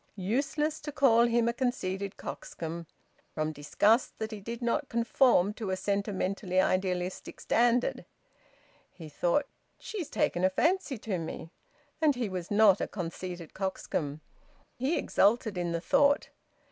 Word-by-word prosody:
Useless 280 +10 -1
to 295 - -6
call 240 -4 +5
him 235 0 +2
a 235 - +1
conceited 200 -6 -2
coxcomb, 165 0 -6 0.5
from 155 0 -1
disgust 205 - +2
that 220 0 -4
he 215 - -6
did 230 +3 -6
not 240 +3 -1
conform 230 -4 +3
to 215 -2 -5
a 190 - -1
sentimentally 195 -2 -1
idealistic 185 -1 -1
standard! 240 +1 +2 0.8
He 160 -3 -11
thought: 175 - +1 0.3
"She's 390 -9 -6
taken 290 -12 0
a 185 - +5
fancy 325 - +1
to 205 -4 -3
me!" 165 0 -6 0.5
And 300 -3 +4
he 240 -4 -2
was 180 -2 -5
not 205 -2 +5
a - - -1
conceited 175 -2 -6
coxcomb. 155 -6 -3 0.5
He 270 +7 0
exulted 220 0 +2
in 175 -1 -2
the 170 - -1
thought. 285 - +3
205 Hz, 140 wpm, -30 LUFS, 180-245 Hz, 0.8 s, call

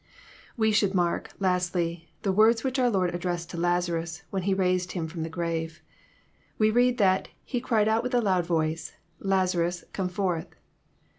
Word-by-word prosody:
We 220 -1 +3
should 205 -2 +2
mark, 175 -2 0
lastly, 175 -3 0
the 195 - +2
words 220 +3 +4
which 265 0 -1
our 250 -1 +4
Lord 185 -5 +1
addressed 175 -1 -3
to - - -6
Lazarus 170 -1 -1
when 195 - -1
he 195 +2 +1
raised 185 -1 +1
him 165 -3 -2
from, 160 +1 -6
the 160 - -3
grave. 165 -1 -3 0.7
We 215 0 +3
read 245 +2 +3
that 190 -3 +3
" - - -40
He 245 - 0
cried 220 -4 +2
with 250 +1 -2
a - - +5
loud 185 -6 +1
voice, 160 -1 -1 0.3
Lazarus, 180 -3 0
come 190 -2 -1
forth 180 -3 -1
180 Hz, 170 wpm, -27 LUFS, 170-205 Hz, 0.7 s, a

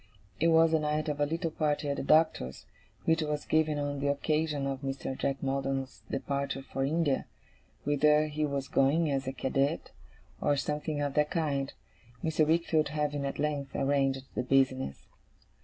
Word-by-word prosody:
It 165 - +3
was 165 0 +5
the 160 - +3
night 150 0 -1
of 145 -1 -2
a 145 - +2
little 165 +2 -2
party 150 -1 0
at 140 - 0
the - - -2
Doctor's, 155 - +2 0.4
which 160 0 +3
was 150 -1 -2
given 155 -1 +2
on 145 -1 -2
the 140 - -1
occasion 150 0 0
of 135 -1 -3
Mr. 135 -1 -3
Jack 135 0 -2
Maldon's 135 -1 -2
departure 140 0 -2
for 135 0 -3
India, 150 0 +1 0.6
whither 150 +1 +4
he 155 0 -2
was 140 -2 -1
going 150 +3 +2
as 135 -1 -1
a - - 0
cadet, 135 +2 -1 0.5
or 145 -1 +2
something 150 +1 -2
of 140 -1 -1
that 150 +1 +2
kind: 140 -5 -1 0.5
Mr. 155 -1 +2
Wickfield 160 -1 +2
having 150 -1 -1
at 135 - -4
length 145 -2 -2
arranged 135 -1 +1
the - - -1
business. 130 - +1
145 Hz, 170 wpm, -30 LUFS, 135-155 Hz, 0.6 s, was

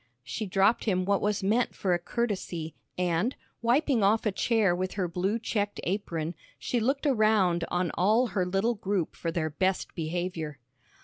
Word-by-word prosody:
She 210 - -4
dropped 195 +4 +3
him 185 -4 +1
what 200 0 +2
was 210 -1 0
meant 225 +5 +1
for 185 -2 0
a 175 - +1
courtesy, 175 -6 -3 0.2
and, 180 +7 +1 0.3
wiping 250 +1 +2
off 210 +3 +3
a 210 - +2
chair 205 -2 +2
with 185 +1 -2
her 190 -3 -1
blue 185 +5 0
checked 205 -3 -2
apron, 170 -4 -2 0.2
she 245 - -1
looked 270 +6 0
around 215 - +3
on 175 -2 0
all 215 +7 +3
her 185 - 0
little 195 +6 +1
group 200 -5 -2
for 165 - -3
their 155 -2 -1
best 185 +4 0
behavior. 165 -2 -3
195 Hz, 170 wpm, -28 LUFS, 175-220 Hz, 0.3 s, dropped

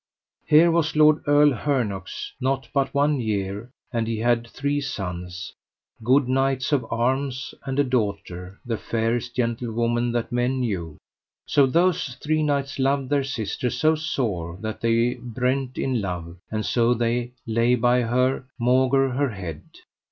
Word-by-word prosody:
Here 165 +3 +6
was 160 -1 +1
Lord 155 0 +5
Earl 145 0 +6
Hernox 115 -8 -2
not 130 -1 0
but 140 -2 +1
one 145 0 +2
year, 105 0 -2 0.2
and 115 -1 0
he 115 -1 -1
had 115 +1 +1
three 145 +4 -2
sons, 90 -8 -5 0.5
good 130 +3 +4
knights 135 0 +1
of 130 -6 +1
arms, 130 +2 -1
and 135 0 -3
a 145 - +4
daughter, 100 -7 -3
the 115 -3 -2
fairest 115 +2 -1
gentlewoman 120 0 0
that 120 -1 -2
men 125 +2 0
knew. 85 -10 -3 0.5
So 140 -2 +4
those 165 -3 +1
three 155 +3 0
knights 140 -2 -1
loved 135 0 +1
their 140 -1 +3
sister 125 -2 -2
so 155 +6 +2
sore 110 - -2
that 110 0 -5
they 115 +2 +2
brent 125 +2 -2
in 130 -4 0
love, 90 -3 -5
and 110 0 -2
so 120 0 +2
they 120 +1 -1
lay 115 +2 +2
by 125 +1 +3
her, 125 +3 +1
maugre 130 +2 +3
her 140 +2 0
head. 90 -8 -6
125 Hz, 150 wpm, -24 LUFS, 115-135 Hz, 0.5 s, Here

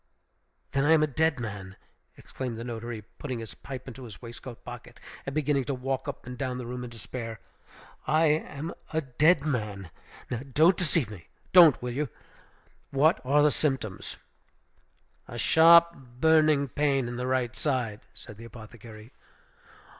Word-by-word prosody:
"Then 135 0 +1
I 155 +2 +5
am 155 -1 +5
a - - +5
dead 155 0 +1
man!" 100 -4 -6 0.4
exclaimed 125 -4 -6
the 115 - -5
notary, 120 -2 -6 0.2
putting 130 -4 -4
his 115 -1 -7
pipe 130 -2 -9
into 130 0 -9
his 110 -5 -10
waistcoat 120 0 -10
pocket, 120 -1 -10 0.3
and 135 - -4
beginning 145 -3 +1
to 140 - -2
walk 130 +2 -3
up 140 - -6
and 125 0 -8
down 130 -2 -2
the 125 - -6
room 125 +1 -5
in 125 - -6
despair. 115 0 -7 0.7
"I 160 +1 +4
am 155 +1 -1 0.2
a 160 0 0
dead 150 +4 +3
man! 105 - -3 0.4
Now 120 - -1
don't 165 +7 +5
deceive 160 -9 0
me, 85 -6 -11 0.3
don't, 170 -7 +8
will 125 -1 -3
you? 145 +1 -2 0.8
What 150 +5 +3
what 130 - -5
are 145 - +6
the 150 - +5
symptoms?" 135 -11 -2 1.1
"A - - -8
sharp, 170 +1 +6 0.3
burning 155 -2 +4
pain 135 -2 +1
in 120 0 -5
the 125 +1 -2
right 130 -1 0
side," 125 -8 -1
said 105 -4 -11
the 115 - -10
apothecary. 110 0 -12
130 Hz, 165 wpm, -28 LUFS, 115-150 Hz, 1.1 s, don't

